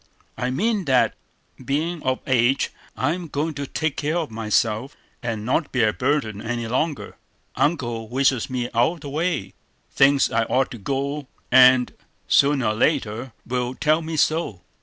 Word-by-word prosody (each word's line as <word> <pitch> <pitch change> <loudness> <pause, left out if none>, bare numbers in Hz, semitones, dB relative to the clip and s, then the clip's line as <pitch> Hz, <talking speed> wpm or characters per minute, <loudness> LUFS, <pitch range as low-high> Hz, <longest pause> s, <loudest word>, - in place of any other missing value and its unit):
"I 125 - -2
mean 205 - 0
that, 130 -3 +3 0.5
being 155 +6 -1
of 130 0 -1
age, 130 -1 +2 0.3
I'm 165 +6 -1
going 150 +2 -2
to 140 -1 -5
take 160 0 -2
care 155 +4 -1
of 160 -8 -3
myself, 110 +3 0 0.3
and 115 -3 -3
not 140 +5 0
be 130 -3 +2
a 105 -1 +3
burden 125 -6 -1
any 115 0 -3
longer. 145 +5 -2 0.4
Uncle 120 -8 -1
wishes 130 -1 +1
me 125 -2 -2
out 120 +7 +3
of 170 - -13
the 145 - -7
way; 155 - -2 0.4
thinks 140 0 +4
I 115 0 +1
ought 130 +3 +1
to 120 - -8
go, 140 +5 -3 0.2
and, 130 0 +6 0.3
sooner 140 -5 +3
or - - 0
later, 120 -1 0
will 125 +1 -2
tell 155 +3 +2
me 160 0 -4
so. 155 - 0
130 Hz, 160 wpm, -23 LUFS, 120-150 Hz, 0.5 s, and